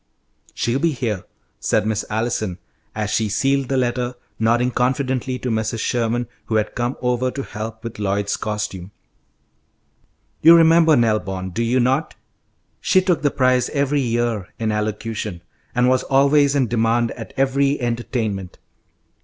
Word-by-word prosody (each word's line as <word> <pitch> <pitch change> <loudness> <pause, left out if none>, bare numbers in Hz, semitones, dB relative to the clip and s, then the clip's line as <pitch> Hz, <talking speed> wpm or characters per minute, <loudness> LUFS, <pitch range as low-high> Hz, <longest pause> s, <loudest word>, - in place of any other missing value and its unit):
"She'll 120 +4 0
be 165 +1 +1
here," 110 -8 -3 0.3
said 105 - +1
Miss 110 -1 -1
Allison, 110 -4 -1 0.4
as 105 -1 -2
she 110 -2 +1
sealed 135 +5 +1
the 135 - +1
letter, 125 0 -1 0.2
nodding 120 +3 +2
confidently 130 +1 0
to 125 -1 -3
Mrs. 110 +1 -1
Sherman, 120 +1 0 0.2
who 110 - -2
had 105 -1 0
come 120 +1 -2
over 125 +1 +1
to 135 +2 -5
help 110 0 -7
with 115 -2 -7
Lloyd's 100 0 0
costume. 105 -4 -4 1.5
"You 165 +2 +9
remember 165 -1 +6
Nell 115 -4 +3
Bond, 95 -1 -5
do 115 - -1
you 120 +2 +2
not? 130 +2 +1 0.6
She 185 - +3
took 180 -2 +1
the 145 - +3
prize 130 -2 +2
every 140 0 +1
year 115 -5 -1
in 110 -1 -1
elocution, 105 -3 -3 0.3
and 125 0 +3
was 130 0 +3
always 140 +1 +3
in 135 -2 +3
demand 115 0 +1
at 115 -2 -8
every 135 +1 +2
entertainment. 115 -6 -3
120 Hz, 150 wpm, -21 LUFS, 110-130 Hz, 1.5 s, You